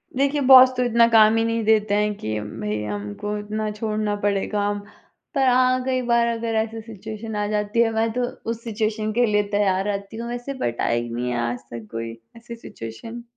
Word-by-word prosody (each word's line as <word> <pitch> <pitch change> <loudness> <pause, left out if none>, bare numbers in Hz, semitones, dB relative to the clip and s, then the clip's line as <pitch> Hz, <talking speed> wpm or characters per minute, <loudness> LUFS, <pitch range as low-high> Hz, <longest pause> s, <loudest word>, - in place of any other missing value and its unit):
देखिए, 280 +2 +1
बॉस 260 -1 +9
तो 250 - +2
इतना 235 -1 +4
काम 220 -1 +6
ही 225 - +2
नहीं 230 0 -1
देते 215 -2 +3
हैं 210 0 +1
कि 110 0 -3
भई 105 -1 -4
हमको 105 - -4
इतना 215 +1 -3
छोड़ना 210 0 -2
पड़े 200 -1 +1
काम, 205 -1 -1 0.6
पर 270 -1 +3
हाँ, 255 0 +3
कई 255 -1 0
बार 235 -1 +2
अगर 230 -1 -2
ऐसी 225 0 -1
सिचुएशन 220 0 -8
आ 210 0 0
जाती 210 +2 -1
है, 225 -1 +3
मैं 225 0 +1
तो 250 0 -1 0.3
उस 230 0 -6
सिचुएशन 215 -1 -2
के 245 +1 +3
लिए 210 -2 +2
तैयार 195 -2 +2
रहती 200 +1 -4
हूँ 235 +1 -5
वैसे 245 +3 -5
बट 120 0 -2
आई 120 0 0
नहीं 120 +1 -3
है 120 - -1
आज 120 0 -4
तक 115 -2 -8
कोई 115 0 -5 0.2
ऐसी 235 0 -9
सिचुएशन। 225 - -9
215 Hz, 200 wpm, -23 LUFS, 200-235 Hz, 0.6 s, बॉस